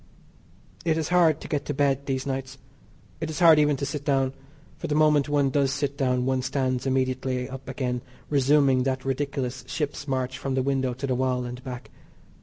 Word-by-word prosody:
It 160 -2 +1
is 160 0 -2
hard 170 -4 +4
to - - -7
get 145 -2 -1
to 145 - -3
bed 140 -1 +1
these 130 -1 -1
nights. 135 -1 -4 0.6
It 160 - -3
is 155 - -5
hard 165 -4 +7
even 150 -1 +3
to 140 - -2
sit 145 0 -4
down, 135 -2 +1 0.5
for - - -4
the 150 - 0
moment 150 -2 +4
one 145 -2 +2
does 140 -1 +2
sit 140 0 -2
down 125 -2 +1
one 130 0 +1
stands 130 -1 -1
immediately 130 -1 0
up 135 0 -8
again 125 -2 -2 0.3
resuming 140 -2 +3
that 130 0 -1
ridiculous 135 -2 -2
ship's 145 +1 -3
march 130 -1 -2
from 135 -1 -2
the 130 - +1
window 130 -2 0
to 135 +3 -4
the 130 - 0
wall 125 0 0
and 125 +1 -7
back. 125 -1 -7
135 Hz, 200 wpm, -26 LUFS, 130-145 Hz, 0.6 s, hard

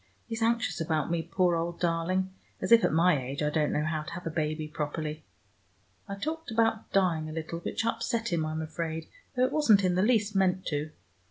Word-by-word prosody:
He's 225 0 -5
anxious 230 -5 +1
about 160 0 0
me, 170 -1 +1
poor 175 +1 +1
old 170 +1 -2
darling, 180 +2 0 0.3
as - - -3
if 230 -1 +8
at - - +3
my 165 -2 +4
age 135 +4 -3
I 150 - +1
didn't 150 -1 +1
know 150 - +1
how 155 -1 -1
to 155 - -8
have 180 +1 -7
a 165 - -2
baby 155 -1 -2
properly. 150 +1 -4 0.8
I 200 - -4
talked 315 +9 -4
about 225 -1 +1
dying 170 -5 +2
a - - -6
little, 160 +1 -4
which 200 - -3
upset 230 -1 -1
him, 165 -2 +1
I'm 155 +1 -2
afraid, 160 0 -4 0.3
though 250 0 +4
it - - -1
wasn't 225 -10 +5
in 180 -1 +3
the 180 - +2
least 210 -2 +2
meant 185 -1 +2
to. 150 0 -2
170 Hz, 210 wpm, -29 LUFS, 155-210 Hz, 0.8 s, if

